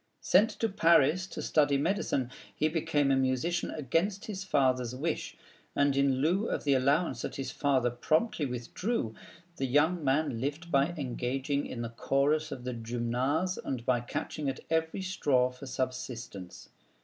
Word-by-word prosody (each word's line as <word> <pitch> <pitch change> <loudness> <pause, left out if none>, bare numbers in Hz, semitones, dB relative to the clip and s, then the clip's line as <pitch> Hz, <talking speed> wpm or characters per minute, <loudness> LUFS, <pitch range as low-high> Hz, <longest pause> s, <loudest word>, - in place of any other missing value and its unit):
Sent 205 +4 +5
to 225 - -1
Paris 170 -2 +4
to - - -6
study 145 -2 +3
medicine, 140 -6 0 0.2
he 155 - +2
became 155 -3 +1
a - - +4
musician 135 +7 0
against 165 - -1
his 195 -3 -5
father's 130 -7 +1
wish, 155 +5 -3 0.4
and 140 -1 +3
in 140 -1 +3
lieu 185 +9 +2
of - - -2
the 140 - +3
allowance 135 0 +2
that - - -4
his 135 - -4
father 130 -4 +1
promptly 155 - +1
withdrew, 125 - -3 0.4
the 135 - -1
young 155 +6 +2
man 135 -3 +1
lived 150 +5 -3
by 140 0 +4
engaging 135 +1 -2
in 120 - -5
the 115 - -4
chorus 145 +6 +1
of 125 - -6
the 125 0 -3
Gymnase, 120 +9 -1
and 125 -3 -4
by 125 -2 +3
catching 140 +4 -3
at 135 - -5
every 160 +3 0
straw 140 -9 +2
for 125 +2 -10
subsistence. 125 -8 -5
140 Hz, 160 wpm, -30 LUFS, 125-160 Hz, 0.4 s, Sent